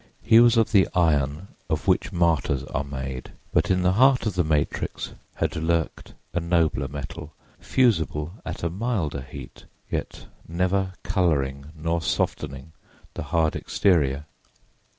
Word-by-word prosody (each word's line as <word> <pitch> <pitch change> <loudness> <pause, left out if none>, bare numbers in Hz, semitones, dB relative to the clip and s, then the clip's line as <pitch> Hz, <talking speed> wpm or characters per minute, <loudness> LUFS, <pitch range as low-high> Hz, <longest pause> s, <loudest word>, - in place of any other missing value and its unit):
He 115 - +7
was 120 0 +6
of 115 - +3
the 100 -4 +5
iron 75 0 +1 0.2
of - - -2
which - - +2
martyrs 85 -6 +1
are 70 - -3
made, 65 -2 -6 0.2
but - - +2
in 90 -1 +2
the 90 - +4
heart 130 +6 +4
of 105 - 0
the 90 0 +1
matrix 75 -2 -1 0.2
had - - -1
lurked 80 0 -1 0.2
a - - +1
nobler 85 -5 +1
metal, 70 +2 -7 0.3
fusible 85 - +1
at - - -6
a 85 - +1
milder 95 - -2
heat, 65 - -10 0.3
yet - - -4 0.2
never 95 +2 0
coloring 70 -8 0
nor 80 +2 -1
softening 70 -2 -2 0.4
the - - -5
hard 80 -2 +2
exterior. 75 -7 +1
85 Hz, 140 wpm, -25 LUFS, 70-95 Hz, 0.4 s, He